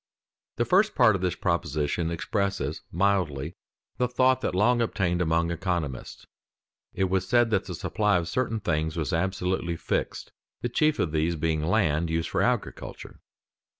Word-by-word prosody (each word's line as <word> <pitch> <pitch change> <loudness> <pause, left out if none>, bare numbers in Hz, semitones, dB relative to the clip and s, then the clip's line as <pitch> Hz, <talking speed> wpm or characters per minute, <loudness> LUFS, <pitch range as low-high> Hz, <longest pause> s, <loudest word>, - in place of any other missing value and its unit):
_ - - -68
The 120 - 0
first 200 - +3
part 110 -5 +5
of 95 - -3
this 90 -2 0
proposition 75 +3 -1
expresses 100 +4 -2
mildly 85 -6 0 0.5
the 125 - +2
thought 130 +1 +2
that 90 - -2
long 120 +5 +3
obtained 90 -6 0
among 85 0 +1
economists: 85 -7 -3 0.7
it - - -1
was 95 0 0
said 120 +1 +3
that 100 -2 +1
the 90 -2 -5
supply 105 +3 +1
of 85 -1 -2
certain 115 +4 -1
things 80 -4 -1
was 80 -4 -2
absolutely 90 -1 -1
fixed, - - -3 0.3
the 120 - -1
chief 155 +5 +2
of 80 - 0
these 80 +2 +1
being 80 0 0
land 85 -3 +1
used 80 0 -1
for - - 0
agriculture. - - -3
90 Hz, 160 wpm, -27 LUFS, 80-110 Hz, 0.7 s, part